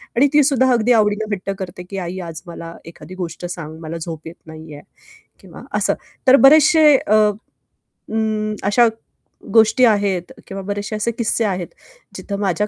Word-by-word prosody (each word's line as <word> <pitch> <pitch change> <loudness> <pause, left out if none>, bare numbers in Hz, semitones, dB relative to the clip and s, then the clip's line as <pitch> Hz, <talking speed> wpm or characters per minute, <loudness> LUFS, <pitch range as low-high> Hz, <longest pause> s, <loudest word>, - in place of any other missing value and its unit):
आणि 275 +4 +4
ती 295 -1 +5
सुद्धा 260 -2 +2
अगदी 240 0 +2
आवडीनं 210 -1 +1
हट्ट 195 0 -5
करते, 180 -1 -7
की 195 - -6
"आई 185 0 -5
आज 160 -1 -8
मला 165 -1 -8
एखादी 175 +2 -12
गोष्ट 175 -1 -6
सांग, 160 -3 -7
मला 165 +1 -6
झोप 160 -1 -7
येत 165 - -9
नाहीये" 155 -2 -11 0.6
किंवा - - -13 0.2
असं. - - +1 0.3
तर 260 +1 +8
बरेचशे 310 0 +6
अ, 215 - -1
अ, 210 0 +1 1.2
अशा 235 +3 +4 0.7
गोष्टी 225 +3 +5
आहेत, 200 -5 0 0.2
किंवा 195 0 -6
बरेचशे 205 +2 -4
असे 215 +2 -1
किस्से 230 0 -1
आहेत. 185 -4 -2 0.5
जिथं 200 -1 -5
माझ्या 205 +1 0
205 Hz, 160 wpm, -19 LUFS, 175-230 Hz, 1.2 s, तर